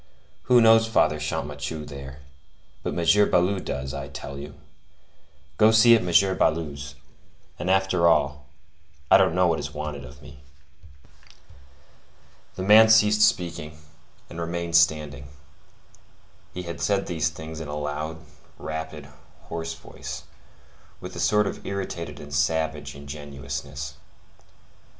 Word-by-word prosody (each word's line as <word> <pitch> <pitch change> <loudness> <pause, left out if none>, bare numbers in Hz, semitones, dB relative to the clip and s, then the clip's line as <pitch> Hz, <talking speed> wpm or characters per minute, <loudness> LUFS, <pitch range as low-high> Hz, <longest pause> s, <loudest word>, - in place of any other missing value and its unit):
Who 125 -1 +7
knows 115 0 +6
Father 75 -8 +2
Champmathieu 75 0 -4
there? 70 -1 -10 0.6
But - - -4
M. 85 +5 +4
Baloup 95 +2 +1
does, 65 +1 -4
I 70 0 -5
tell 70 0 -8
you. 70 +1 -9 1.0
Go 110 - +7
see 110 +1 +7
at 115 - +2
M. 95 +2 +3
Baloup's; 70 -3 -1 0.6
and 90 - -3
after 95 -2 +3
all, 75 -3 +1 0.6
I - - +9
don't 80 - +2
know 90 0 +3
what 85 -2 +1
is - - -6
wanted 75 -2 -5
of 60 - -13
me." 70 - -13 2.2
The 95 - -4
man 110 +3 +7
ceased 105 -1 +5
speaking, 85 -6 +1 0.5
and 85 - -7
remained 85 0 -3
standing. 75 -4 +2 1.2
He 90 - -6
had 85 -1 -7
said 100 -1 +1
these 80 -2 -1
things 80 0 -8
in 80 - -6
a 75 0 -5
loud, 75 +2 -4 0.4
rapid, 80 -2 -6 0.4
hoarse 80 0 -4
voice, 85 - -9 0.8
with - - -9
a - - -6
sort 105 0 +3
of - - -5
irritated 95 -4 -5
and 75 -1 -10
savage 75 0 -1
ingenuousness. 70 -1 -7
80 Hz, 130 wpm, -25 LUFS, 75-90 Hz, 2.2 s, I